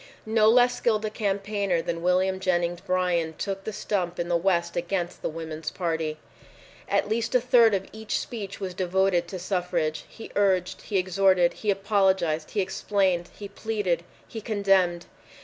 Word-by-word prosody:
No 220 0 +4
less 245 +1 +5
skilled 215 -2 +1
a 215 - -2
campaigner 200 -3 -1
than 165 0 -3
William 185 +2 +2
Jennings 175 -2 0
Bryan 180 -3 0
took 195 +1 -4
the 220 - -3
stump 190 -4 -2
in 175 0 -2
the 175 - +2
West 170 -1 +1
against 175 0 -2
the - - -2
Woman's 160 -1 -5
Party. 160 -3 -2 0.7
At - - +1
least 230 +2 -1
a - - +7
third 235 -3 +5
of 195 0 -2
each 220 0 -3
speech 205 -5 -6
was 190 -2 -4
devoted 185 -1 +1
to 185 - -6
suffrage. 175 -4 -2
He 225 - -11
urged. 190 -3 +1
He 205 - -2
exhorted. 185 -1 +3
He 215 - -4
apologized. 190 -6 +1
He 205 - 0
explained. 190 -2 0
He 205 - -7
pleaded. 200 -4 -2 0.3
He 225 - -7
condemned. 195 -5 +2
190 Hz, 165 wpm, -26 LUFS, 175-205 Hz, 0.7 s, a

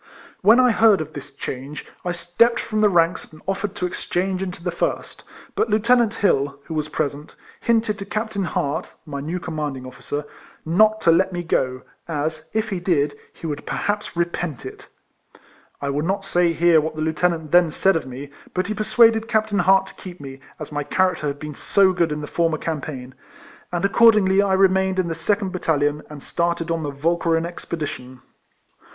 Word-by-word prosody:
When 220 +5 +6
I 250 -1 +5
heard 220 -2 +5
of 155 0 -6
this 145 0 -8
change, 135 +1 -6 0.2
I 180 - -1
stepped 175 +8 +2
from 215 -1 -2
the 210 - +5
ranks 170 -1 +1
and 155 - -14
offered 195 +1 -2
to 180 - -2
exchange 185 +1 -2
into 180 -3 -5
the 175 - -1
first, 170 - -3 0.3
but - - 0
Lieu 210 - +3
tenant 235 0 +3
Hill, 140 -7 +1
who 165 - -7
was 155 -1 -2
present, 145 0 -3 0.2
hinted 225 -2 +1
to 195 - -5
Cap 220 +2 -3
tain 200 -3 -2
Hart 145 -4 -2
(my 140 -2 -5
new 165 +5 -3
commanding 150 -6 -4
officer) 145 +3 -5 0.4
not 215 +6 +3
to 165 - +5
let 185 +3 +3
me 175 -1 -3
go, 130 -5 -1 0.2
as, 155 0 -3
if 220 0 -1
he 195 -3 -2
did, 150 -5 +1 0.2
he - - -12
would 145 -2 -4
perhaps 205 -3 -2
repent 170 -5 -2
it. - - -9 1.0
I 140 - 0
will 145 +1 -1
not 195 +3 -1
say 175 -3 +2
here 165 -1 +4
what 155 +1 -4
the 155 - -4
Lieutenant 160 0 0
then 175 -1 +5
said 190 +4 +2
of 160 -5 -2
me, 135 +3 -8 0.2
but 185 +1 0
he 215 - -2
persuaded 220 +1 +3
Captain 215 -3 +1
Hart 190 +1 +4
to - - -12
keep 180 -2 -9
me, 135 -1 -9 0.2
as 155 - -7
my 145 0 -2
character 180 +1 +1
had 140 0 -3
been 150 +1 -7
so 190 +5 +3
good 170 -3 +1
in 150 0 -3
the - - -4
former 165 +1 0
campaign; 140 -5 -5 0.6
and 175 +2 0
accordingly 200 -2 +5
I 200 -1 +1
remained 190 0 +3
in 180 -2 0
the - - -1
second 195 +4 0
battalion, 150 -5 0
and 150 -2 -9
started 170 0 -1
on 165 -1 -1
the 150 - -3
Walcheren 165 +3 0
expedition. 150 -7 -6
170 Hz, 195 wpm, -22 LUFS, 150-195 Hz, 1.0 s, When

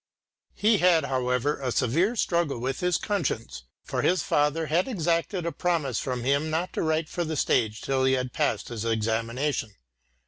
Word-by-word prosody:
He 215 0 +3
had, 170 -4 +4
however, 130 +1 0
a 130 -2 -1
severe 165 - +1
struggle 170 - 0
with 130 +3 -3
his 180 -1 +1
conscience, 130 - -3 0.2
for - - -2
his 180 +1 +2
father 150 +2 +1
had 165 - +1
exacted 170 -4 -1
a 170 - -1
promise 155 - -1
from 125 -2 -3
him 140 +4 +1
not 165 +3 -2
to - - -1
write 160 0 0
for 175 - -3
the 160 -1 -3
stage 110 -4 +1
till 135 -1 0
he 130 - +3
had 125 -1 -1
passed - - -1
his 115 -3 -4
examination. 115 +2 -1
145 Hz, 175 wpm, -26 LUFS, 125-170 Hz, 0.2 s, had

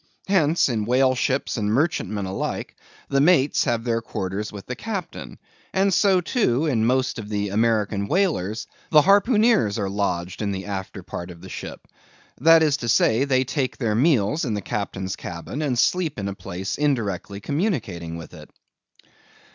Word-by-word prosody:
Hence, 170 -4 +3
in 110 -5 -1
whale 130 +3 +3
ships 130 +1 -1
and 105 -1 0
merchantmen 110 - 0
alike, 95 +1 -4 0.3
the 140 0 +2
mates 150 -3 +4
have 115 -1 0
their 115 -1 0
quarters 105 -1 -4
with 100 -1 -9
the 125 - -5
captain; 195 - -6 0.4
and 195 0 +3
so, 190 0 +4
too, 165 - +1
in 115 -7 +1
most 130 -1 +1
of 105 -2 -7
the 105 -1 -1
American 105 -1 +1
whalers 115 - 0 0.2
the 150 -2 +6
harpooneers 205 - +4
are 100 -3 -2
lodged 90 -3 -2
in 100 -2 -1
the 95 -1 -4
after 95 -1 -5
part 85 0 -7
of 85 -1 -11
the 95 - -10
ship. - - -8 0.5
That 165 +4 +6
is 150 -2 +2
to 120 -4 -4
say, 115 +3 +3
they 130 -2 +2
take 130 0 -2
their 115 -5 0
meals 130 +2 +2
in 115 -7 -1
the 105 - -3
captain's 95 0 -4
cabin, 85 - -6
and 135 -5 0
sleep 170 +3 +1
in 100 -1 -3
a 100 - -3
place 95 +2 -5
indirectly 105 - -1
communicating 105 - -2
with 80 - -10
it. - - -12
115 Hz, 170 wpm, -23 LUFS, 100-150 Hz, 0.5 s, the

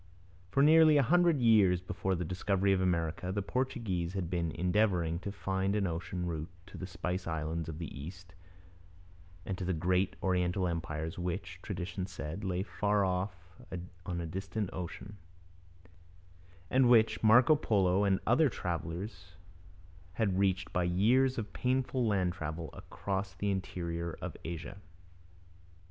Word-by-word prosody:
For 140 +9 +3
nearly 155 0 +7
a 140 - +5
hundred 170 +2 +4
years 105 -6 +5
before 95 +1 -2
the 90 0 -3
discovery 95 +3 +1
of 95 - +1
America 90 0 0
the 100 0 -1
Portuguese 95 -8 -2
had 95 -3 -3
been 85 -2 0
endeavouring 90 -3 +1
to 100 - -5
find 95 0 -1
an 105 -2 +1
ocean 85 +1 -3
route 80 -1 -3 0.2
to 100 - -11
the 95 - -5
spice 90 0 -3
islands 80 0 -2
of 80 - -6
the 85 -1 -6
East 85 +4 -9 1.1
and 95 - -2
to - - -3
the 90 0 0
great 90 +3 +1
Oriental 90 0 +1
empires 80 -1 -3
which, 90 -1 -4
tradition 90 +1 -4
said, 85 0 -6
lay 95 -1 -1
far 105 -1 +1
off 90 +1 -1 0.7
on 85 -1 -3
a 85 - -3
distant 95 +4 -3
ocean, 95 +3 -7 1.5
and 130 -1 +5
which 110 -2 +5
Marco 125 +7 +7
Polo 100 -8 +2
and 95 -2 +3
other 140 +5 +4
travellers 90 0 -5 0.8
had 95 -1 0
reached 95 -2 +1
by 90 - +2
years 120 +10 +3
of 105 -4 -4
painful 130 -1 0
land 95 -4 +1
travel 80 -1 -5
across 95 -1 -4
the 100 +2 -1
interior 85 -3 -3
of - - -6
Asia. 85 +4 -6
95 Hz, 145 wpm, -32 LUFS, 85-105 Hz, 1.5 s, nearly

